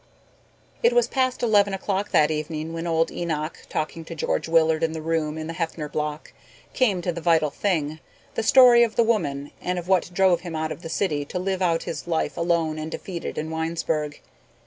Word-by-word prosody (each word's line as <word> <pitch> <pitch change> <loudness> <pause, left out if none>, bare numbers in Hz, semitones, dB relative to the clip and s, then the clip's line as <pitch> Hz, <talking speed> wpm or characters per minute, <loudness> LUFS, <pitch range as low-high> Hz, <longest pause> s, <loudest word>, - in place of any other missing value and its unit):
It 475 +1 +4
was 485 0 +4
past 255 -2 0
eleven 205 -4 +3
o'clock 195 +1 -2
that 150 0 +4
evening 155 +1 -3
when 165 +1 -4
old 165 0 +1
Enoch, 160 -2 -3
talking 155 +1 -3
to 165 - -7
George 160 - -1
Willard 160 -1 +3
in 160 -1 0
the 160 - -4
room 160 -1 -1
in 155 - -4
the 165 - -5
Heffner 160 -2 -3
Block, 150 +1 -4 0.4
came 200 -9 +1
to 175 - 0
the 170 0 -6
vital 160 -3 +3
thing, 155 -6 -1 0.3
the - - -1
story 245 +1 +7
of 230 -2 +2
the 235 - +4
woman 145 -11 -1
and 180 0 -2
of 175 0 -5
what 185 -3 +2
drove 180 -2 +3
him 175 -2 -6
out 155 0 -2
of - - -6
the 165 - -7
city 155 -5 0
to 180 - -5
live 190 +1 -2
out 170 -2 +1
his 160 +1 -6
life 165 -2 -1
alone 170 -2 0
and 155 +1 -4
defeated 175 +1 -6
in 155 +1 -3
Winesburg. 160 -2 -2
165 Hz, 205 wpm, -24 LUFS, 155-190 Hz, 0.4 s, story